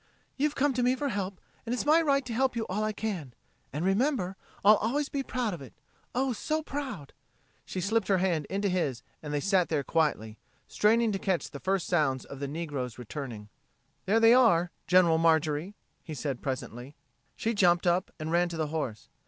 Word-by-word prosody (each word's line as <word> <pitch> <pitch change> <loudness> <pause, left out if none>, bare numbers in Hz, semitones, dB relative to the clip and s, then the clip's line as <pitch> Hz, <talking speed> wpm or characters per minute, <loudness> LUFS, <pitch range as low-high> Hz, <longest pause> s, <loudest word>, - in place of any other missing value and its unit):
"You've 295 +2 0
come 285 0 +2
to 250 - 0
me 250 +1 +3
for 285 +1 -2
help, 195 -4 -3 0.2
and 235 - -3
it's 250 - -3
my 310 +3 +5
right 280 -4 +2
to 240 - -4
help 260 +2 +1
you 225 -1 -1
all 205 +3 -2
I 215 - 0
can. 190 - -4 0.4
And 150 +5 -3
remember, 195 -1 +1 0.3
I'll 210 +1 +8
always 275 +7 -1
be 280 - -2
proud 250 -5 -2
of 170 - -7
it. 130 - -11 0.4
Oh, 260 0 +1
so 310 +7 -2
proud!" 260 - -5 0.5
She 185 - -4
slipped 220 +5 +1
her 195 - +3
hand 175 -5 0
into 200 +1 0
his 150 -10 -1 0.2
and 150 - -6
they 145 - 0
sat 190 +1 +2
there 150 -3 0
quietly, 125 -10 0 0.3
straining 225 +1 +3
to 195 - -2
catch 190 -3 -1
the 140 - -7
first 190 0 0
sounds 145 -7 +1
of 140 - -9
the 140 - -3
negroes 145 -5 -4
returning. 120 -4 -7 0.6
"There 215 +4 +4
they 225 +1 +7
are 180 -9 +4 0.2
General 175 -3 +5
Marjorie," 160 +3 +2 0.3
he 155 - -7
said 140 -3 -3
presently. 130 0 -5 0.4
She 230 - -1
jumped 175 -4 +3
up 175 +1 +2
and 155 +1 -4
ran 175 +1 +2
to 170 - -5
the 155 -2 -1
horse. 130 -9 -3
185 Hz, 200 wpm, -29 LUFS, 150-230 Hz, 0.6 s, I'll